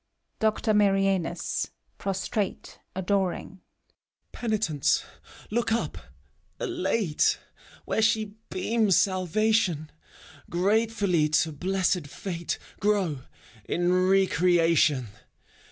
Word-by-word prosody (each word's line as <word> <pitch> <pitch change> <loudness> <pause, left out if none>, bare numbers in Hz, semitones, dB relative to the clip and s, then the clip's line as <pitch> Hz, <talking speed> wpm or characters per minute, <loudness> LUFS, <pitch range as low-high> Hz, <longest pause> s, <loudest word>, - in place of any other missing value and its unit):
DOCTOR 220 0 +1
MARIANUS 195 -4 +1 0.3
(prostrate, 195 +1 -3 0.2
adoring). 190 0 -1 0.7
Penitents, 215 - 0 0.5
look 235 +1 0
up, 230 - -1 0.6
elate. 230 - +1 0.5
Where - - 0
she 220 -2 +1 0.2
beams 205 +1 +2
salvation; 185 -3 +1 0.6
Gratefully 200 -3 +2
to 160 +1 +2
blessed 180 0 0
fate 170 +2 -4 0.2
Grow, 195 -8 +1 0.5
in 175 +1 0
re 190 +1 +4
creation! 165 - +3
190 Hz, 75 wpm, -27 LUFS, 175-215 Hz, 0.7 s, re